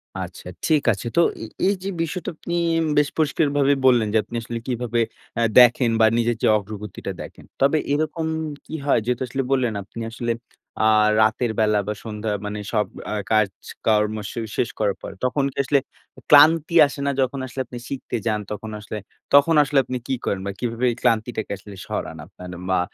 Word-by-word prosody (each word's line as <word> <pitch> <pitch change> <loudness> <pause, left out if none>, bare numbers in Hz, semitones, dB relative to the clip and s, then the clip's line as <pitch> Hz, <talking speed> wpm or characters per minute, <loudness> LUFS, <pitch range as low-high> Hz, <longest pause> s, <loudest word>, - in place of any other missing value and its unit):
আচ্ছা, - - -7 0.2
ঠিক 155 -3 +3
আছে। 110 - -6
তো - - +7 0.2
এ - - -4 0.2
এই 200 - +3
যে, 195 - -2
বিষয়টা 165 +1 -3
আপনি 170 - -6 0.3
এম 165 - +1
বেশ 145 -1 +4
পরিষ্কারভাবে 145 -2 +2
বললেন 120 -4 +5
যে, 110 - +4
আপনি - - -9
আসলে 115 0 -5
কীভাবে 120 -1 -1 0.4
আ - - +2 0.2
দেখেন 120 0 +6
বা 110 - +6
নিজের 120 -1 +1
যে, - - +5
অগ্রগতিটা 105 -1 -6
দেখেন। - - -11 0.2
তবে 140 +3 +4 0.2
এরকম 155 +2 -1 0.4
কী - - -6
হয়? 140 - +4
যেহেতু 125 0 -1
আসলে 135 +2 -2
বললেন, 125 -4 +2
আপনি 100 +4 -11
আসলে 120 0 -2 0.5
আ - - +6 0.3
রাতের 110 +2 +2
বেলা 105 -1 +3
বা 105 - 0
সন্ধ্যা 105 -1 -4
মানে 105 0 -4
সব 105 -2 +2 0.3
আ - - -1 0.2
কাজকর্ম 105 +1 +1 0.2
শু - - -5 0.2
শেষ 120 - +1
করার 105 -2 +1
পর, - - -7
তখন 135 +2 +1
কি - - -24
আসলে 140 +1 +3 0.5
ক্লান্তি 155 +3 +6
আসে 140 - -9
না, 140 - +2
যখন 130 +1 -1
আসলে 130 - -8
আপনি 120 +1 -9
শিখতে 130 -3 -4
যান? 110 -2 +1
তখন 110 +1 -5
আসলে, 105 +1 -6 0.4
তখন 145 +3 +6
আসলে 145 0 -1
আপনি 130 - -3
কি 135 - 0
করেন 100 - 0
বা 100 - -2
কিভাবে 120 0 -1
এই - - -5
ক্লান্তিটাকে 115 -1 0
আসলে 100 +1 -12
সরান 80 - -4
আপনার 90 +1 -12 0.2
বা 95 - +3
120 Hz, 190 wpm, -23 LUFS, 110-140 Hz, 0.5 s, তো